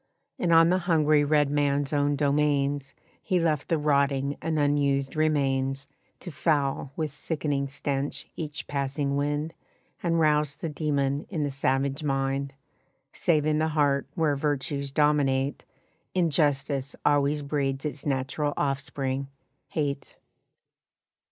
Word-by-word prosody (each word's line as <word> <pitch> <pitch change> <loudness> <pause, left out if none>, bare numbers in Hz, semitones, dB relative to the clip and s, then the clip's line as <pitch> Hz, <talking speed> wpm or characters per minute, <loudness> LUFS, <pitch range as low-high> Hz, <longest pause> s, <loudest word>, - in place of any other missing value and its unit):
And 175 - +1
on 165 0 +7
the 185 +1 +3
hungry 155 -4 +3
red 145 -1 +2
man's 145 0 +1
own 145 0 +2
domains 140 -1 +1 0.3
He 185 - +1
left 155 -4 0
the 165 - +2
rotting 140 -1 +1
and 160 -1 -1
unused 140 -2 +1
remains 135 -3 +1 0.4
To 175 - -7
foul 140 -3 0
with 155 -2 -2
sickening 145 -2 -2
stench 140 0 -3
each 150 -1 -5
passing 140 0 -2
wind 145 +3 -1 0.5
And 165 -1 +1
rouse 150 -2 +2
the 165 - -4
demon 145 -2 -1
in 160 -6 -2
the 145 - -1
savage 135 +2 0
mind, 135 -1 -1 0.6
Save 155 -4 +2
in 155 0 +2
the 160 - +2
heart 140 -2 +2
where 155 -3 +2
virtues 140 0 -1
dominate 140 -2 +1 0.5
Injustice 145 -5 +1
always 145 0 +2
breeds 140 -1 -1
its 150 -1 -4
natural 140 +1 -1
offspring 135 -1 -2 0.4
hate. 140 -3 -3
145 Hz, 125 wpm, -27 LUFS, 140-150 Hz, 0.6 s, on